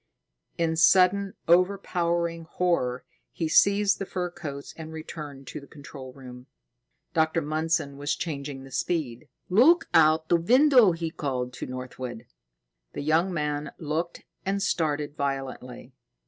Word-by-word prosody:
In 165 -1 +1
sudden, 190 +3 +4
overpowering 170 -2 +1
horror, 165 -8 -1 0.3
he 165 - -2
seized 200 +4 +4
the 195 - -3
fur 180 -2 -3
coats 140 -5 -7
and 160 -1 -8
returned 150 -3 -8
to - - -7
the 140 - -14
control 140 -2 -10
room. 125 -1 -12 0.7
Dr. 160 +1 +2
Mundson 155 -1 -1
was 145 0 -1
changing 140 -4 -5
the 135 - -13
speed. 130 -3 -2 0.2
"Look 260 - +5
out 160 0 +5
the 170 - +4
window!" 245 - +5
he 165 -1 -4
called 125 -5 -3
to - - -6
Northwood. 125 -2 -7 0.7
The - - -5
young 160 +5 +2
man 150 -3 -2
looked 165 +2 -3 0.2
and 195 +1 -1
started 150 -2 -1
violently. 135 -3 -4
160 Hz, 135 wpm, -26 LUFS, 140-175 Hz, 0.7 s, Look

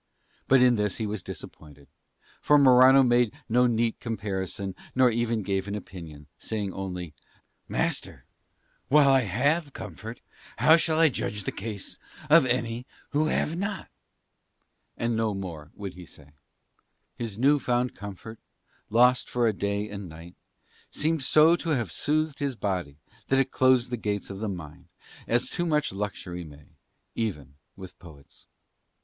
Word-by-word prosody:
But 130 -1 +5
in 125 -2 +4
this 105 -2 0
he 110 - -2
was 105 -1 -4
disappointed; 75 -5 -11 0.5
for 150 - +5
Morano 130 0 +7
made 120 -2 +2
no 125 +2 +3
neat 115 -1 0
comparison 100 -3 -4 0.2
nor 125 -1 +5
even 115 -1 -1
gave 95 0 -2
an 100 - -3
opinion, 85 -7 -9
saying 105 -4 -3
only, 90 -4 -5 0.5
"Master, - - -2 0.6
while 145 0 +5
I 135 0 +6
have 140 - 0
comfort 110 +4 -8 0.4
how 160 - +6
shall 160 -1 +1
I 165 -1 +6
judge 105 -5 -3
the - - -3
case 105 -1 -7 0.3
of 155 -4 +7
any 120 0 -2 0.2
who 155 +2 +1
have 155 0 0
not?" 200 +1 -4 1.1
And 115 0 -1
no 110 -2 0
more 85 -6 -7
would 100 -3 -6
he 90 -1 -12
say. 75 -1 -15 0.8
His 115 -4 -5
new 140 +5 +4
found 125 0 0
comfort, 100 +3 -9 0.5
lost 125 +3 +4
for 120 -1 +1
a 110 - +2
day 100 +1 -2
and 100 -3 -7
night, 85 +2 -12 0.6
seemed 160 0 -1
so 155 +5 +5
to 170 - -5
have 115 -8 -3
soothed 155 - -1
his 140 -3 -2
body 90 -10 -3 0.3
that 135 - +2
it 135 -1 +1
closed 130 -1 +3
the 120 - -1
gates 105 -2 -3
of 95 - -7
the 110 0 -2
mind, 85 -1 -8 0.4
as 120 +1 +2
too 175 -1 -2
much 150 - 0
luxury 95 -3 -5
may, 75 -2 -14 0.4
even 75 - -4 0.2
with 95 -2 -11
poets. 75 -7 -16
110 Hz, 155 wpm, -27 LUFS, 95-130 Hz, 1.1 s, Morano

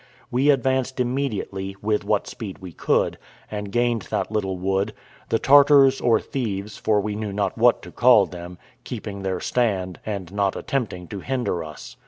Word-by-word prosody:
We 130 +4 +2
advanced 130 -1 +1
immediately, 120 -7 -2
with 105 0 0
what 105 -2 +1
speed 100 -5 -7
we 95 -2 -9
could, - - 0 0.3
and 105 -1 -4
gained 120 -1 +1
that - - -2
little 95 -4 -1
wood; 95 +2 -1 0.3
the 115 - +3
Tartars, 140 0 +6
or 115 -2 +4
thieves, 105 -5 -4
for 105 -1 +1
we 105 +1 -2
knew 105 -1 -3
not 100 -1 -1
what 120 +1 +3
to - - -10
call 120 -5 +6
them, 90 0 -9 0.3
keeping 100 -1 -6
their 95 -2 -2
stand, 95 -8 -1
and 100 -4 -5
not 100 -1 +1
attempting 110 -11 -3
to 100 - -5
hinder 120 -7 -2
us. 75 -1 -10
105 Hz, 170 wpm, -23 LUFS, 95-125 Hz, 0.3 s, Tartars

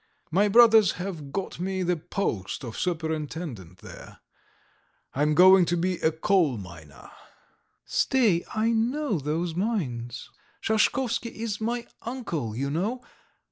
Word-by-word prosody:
My 200 +5 +3
brothers 225 -2 +6
have 175 -6 -6
got 195 +1 -4
me 190 +1 -2
the 180 0 +1
post 145 - -3
of 115 -3 -7
superintendent 155 - -4
there.... - - -12 1.0
I 140 - -2
am 150 0 +2
going 185 +1 +7
to 175 +1 0
be 180 +1 0
a 160 - +2
coal 160 - +1
miner." 85 -7 -12 0.7
"Stay, 220 -10 +2
I 220 +1 +2
know 235 - 0
those 160 +4 -2
mines. 135 - -3 0.3
Shashkovsky 235 +2 0
is 220 -1 -4
my 235 +2 -2 0.2
uncle, 170 - -4
you 140 +3 -2
know. 210 - -2
180 Hz, 130 wpm, -26 LUFS, 150-220 Hz, 1.0 s, going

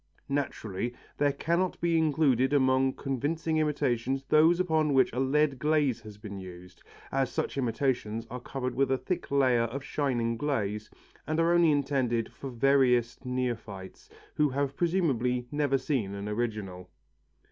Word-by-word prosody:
Naturally 120 -5 -3 0.2
there 145 -1 +3
cannot 170 +6 -1
be 170 -1 +1
included 145 -4 +2
among 130 -1 +3
convincing 155 +4 -2
imitations 135 -4 0
those 160 +3 +5
upon 160 -5 +2
which 130 - +4
a 125 - -2
lead 135 0 +2
glaze 150 -5 +1
has 105 -2 -11
been 105 -2 -8
used, 90 -1 -11 0.3
as 135 -1 0
such - - -2
imitations 120 -3 -1
are 125 - -4
covered 125 0 -4
with 135 0 +1
a 135 - +2
thick 180 +8 -4
layer 130 -4 +3
of 130 +4 -5
shining 125 -5 -1
glaze 105 -7 -2 0.4
and 155 +1 0
are 165 +1 +3
only 170 -1 +5
intended 135 -5 0
for 135 - -7
veriest 125 -1 +2
neophytes 115 -7 -4 0.2
who 150 -1 +2
have 140 +1 -2
presumably 135 -9 +1
never 145 -2 +1
seen 130 -8 -2
an 100 +1 -5
original. 105 -5 -4
130 Hz, 145 wpm, -29 LUFS, 115-145 Hz, 0.4 s, those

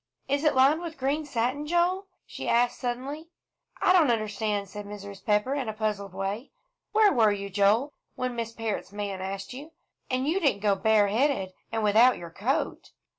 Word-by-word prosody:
"Is 280 +2 0
it 305 - +3
lined 275 +5 +5
with 335 -2 -6
green 285 +3 -1
satin, 265 +3 -1
Joel?" 355 +4 +1 0.2
she - - -6
asked 240 +1 +2
suddenly. 270 +6 -4 0.6
"I 365 - +5
don't 335 -7 +5
understand," 210 -2 -1
said 205 +1 -8
Mrs. 200 -1 -9
Pepper, 210 +5 +1
in 270 -5 -2
a - - -3
puzzled 210 -3 -3
way. 195 +6 -3 0.4
"Where 430 -3 +5
were 225 -5 +4
you, 200 -1 -4
Joel, 210 +9 +2 0.2
when 255 -1 -3
Miss 230 -1 -3
Parrott's 225 -4 -4
man 200 -2 -4
asked 195 +3 -5
you? 295 +5 -10 0.4
And 255 +1 0
you 340 +5 +2
didn't 275 - +1
go 205 -1 +3
bareheaded, 210 +1 +2 0.2
and 225 -1 -1
without 225 +5 +5
your 170 -1 -9
coat?" 225 +10 -2
230 Hz, 175 wpm, -27 LUFS, 205-280 Hz, 0.6 s, lined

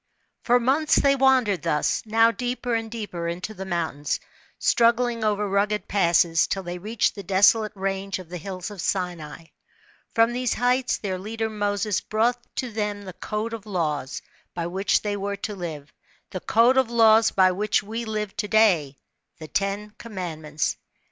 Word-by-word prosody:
For 245 0 +3
months 275 +6 +2
they 275 0 +4
wandered 255 - +3
thus, 150 -2 0
now 225 +1 +4
deeper 245 0 -3
and 225 -1 -1
deeper 205 -7 -5
into 180 +5 -4
the 190 -2 -7
mountains, 160 -5 -2 0.4
struggling 235 0 +2
over 210 -1 +1
rugged 205 +2 0
passes, 170 -3 +3
till 195 - -2
they 175 0 -5
reached 215 +4 0
the 200 - -7
desolate 200 +3 +4
range 195 0 -2
of 185 -2 -10
the 180 0 -6
hills 185 +2 -6
of 200 -4 -7
Sinai. 175 -5 -3 0.7
From 230 0 +4
these 250 -1 -1
heights 250 +1 +1
their 190 -3 -4
leader 220 +3 -3
Moses 205 -1 -1
brought 235 +3 0 0.2
to 250 -2 -3
them 210 -1 -3
the 185 -2 -8
c^de 215 +5 -4
of 220 -2 -7
laws, 155 -8 -2 0.3
by 170 -1 -2
which 190 +4 0
they 205 -1 -1
were 200 0 -3
to 210 +2 -4
live, 160 -6 -7 0.4
the 185 - -4
code 235 +7 +3
of 260 -3 +3
laws 225 -1 +5
by 185 -1 +4
which 205 +3 0
we 225 +3 -4
Irve 215 -2 -4
to 210 - -2
day 180 -11 +3 0.4
the 155 - -9
Ten 200 +5 -2
Commandments. 165 -8 -4
205 Hz, 170 wpm, -24 LUFS, 180-225 Hz, 0.7 s, laws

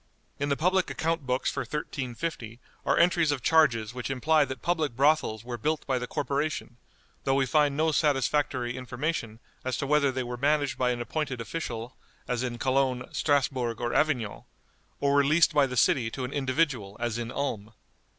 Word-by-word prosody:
In 145 0 -1
the 140 - +1
public 185 +3 +2
account 165 -4 -2
books 125 +1 0
for - - -4
1350 130 -4 -4 0.3
are - - +3
entries 170 -2 +4
of 135 -4 -3
charges 120 -9 +3
which 125 0 -5
imply 150 +3 +3
that 130 -2 -7
public 160 -7 0
brothels 140 -5 +2
were 120 -1 -6
built 155 +7 -1
by 130 -2 0
the 125 - -4
corporation, 145 -3 -2 0.5
though 135 - +2
we 135 -1 +3
find 145 +1 +2
no 160 +1 +2
satisfactory 135 -4 +1
information 125 -2 -3 0.2
as 130 0 -2
to 140 - -2
whether 145 -1 +3
they 130 0 -2
were 120 0 -5
managed 145 +1 +1
by 125 -1 +2
an 120 -1 -1
appointed 130 +1 -3
official 120 -2 -5 0.3
as 125 -2 -1
in 125 -2 -3
Cologne, 130 0 0
Strasbourg, 130 -5 +1
or 120 0 -2
Avignon, 125 -9 0 0.5
or 140 0 +2
were 140 0 +5
leased 155 +4 +4
by 145 -2 +4
the 125 -1 -5
city 130 -4 +3
to 130 +3 -5
an 125 - -6
individual 130 -7 0
as 120 -1 -2
in 120 0 -4
Ulm. 115 -6 -3
135 Hz, 180 wpm, -28 LUFS, 120-150 Hz, 0.5 s, were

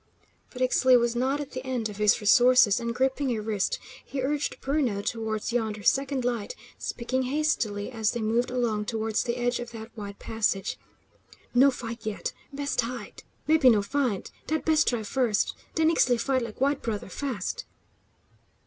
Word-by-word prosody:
But 255 0 -3
Ixtli 255 0 +5
was 235 0 0
not 265 +4 +1
at 285 -1 -6
the 255 0 -5
end 255 -4 -2
of 210 -2 -9
his 210 -1 +4
resources, 245 +1 +6
and 235 0 -3
gripping 265 -1 +1
a - - -2
wrist, 210 -2 -1 0.3
he 275 - -5
urged 290 +2 -1
Bruno 260 -8 0
towards 220 0 -2
yonder 220 -3 -1
second 270 0 +1
light, 240 - -2 0.2
speaking 255 +2 -2
hastily 255 -8 0
as 220 -3 0
they 240 - -2
moved 230 +3 +1
along 235 -4 0
towards 220 -1 -1
the 240 0 -2
edge 245 0 0
of 240 -1 -6
that 225 +1 -9
wide 200 -2 -7
passage. 210 -3 -1 0.7
"No 260 +3 +6
fight, 235 -3 -6
yet. 215 -2 -3 0.2
Best 285 -1 -1
hide; 230 -2 -6 0.3
mebbe 315 -2 +3
no 220 -5 +6
find; 250 -4 -1 0.2
dat 315 0 -1
best 315 -1 +3
try 235 -3 +1
first. 225 -1 +1 0.2
Den 320 0 +4
Ixtli 245 -7 +3
fight 260 +2 +1
like 230 -2 -6
white 280 +1 +2
brother, 215 -3 -3
fast!" 230 -1 -4
240 Hz, 170 wpm, -27 LUFS, 220-265 Hz, 0.7 s, resources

